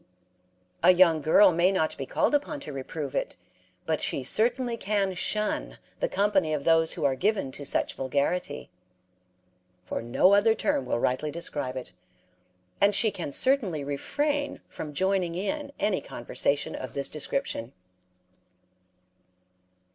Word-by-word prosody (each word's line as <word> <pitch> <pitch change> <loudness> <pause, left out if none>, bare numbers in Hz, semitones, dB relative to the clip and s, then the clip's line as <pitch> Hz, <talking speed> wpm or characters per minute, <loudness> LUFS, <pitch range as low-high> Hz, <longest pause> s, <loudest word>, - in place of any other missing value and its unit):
A 180 - +7
young 170 -4 +5
girl 185 +6 +6
may 175 +3 +3
not 160 -5 0
be 135 - -6
called - - +1
upon 290 0 0
to 150 - -7
reprove 135 +1 -5
it, - - -2 0.5
but 160 -1 -1
she 135 - -1
certainly 240 - 0
can 200 -3 0
shun 180 - -1 0.2
the - - 0
company 190 -5 +1
of 140 - -4
those 165 0 +3
who - - -3
are 135 - +3
given 195 -3 0
to 145 - -9
such - - 0
vulgarity 140 - -2 1.1
(for - - -4
no 120 +11 +3
other 215 +2 +4
term 290 +2 -1
will - - 0
rightly 130 +5 0
describe 145 -5 -3
it), 130 - -8 0.9
and 200 0 +4
she 220 +1 +4
can 170 -7 -5
certainly 210 - +2
refrain 285 - -2
from 150 - -7
joining 185 +1 0
in 280 - -3
any 205 -2 0
conversation 140 +4 -1
of 130 - -7
this 140 -1 0
description. 135 -5 -3
170 Hz, 140 wpm, -27 LUFS, 140-210 Hz, 1.1 s, A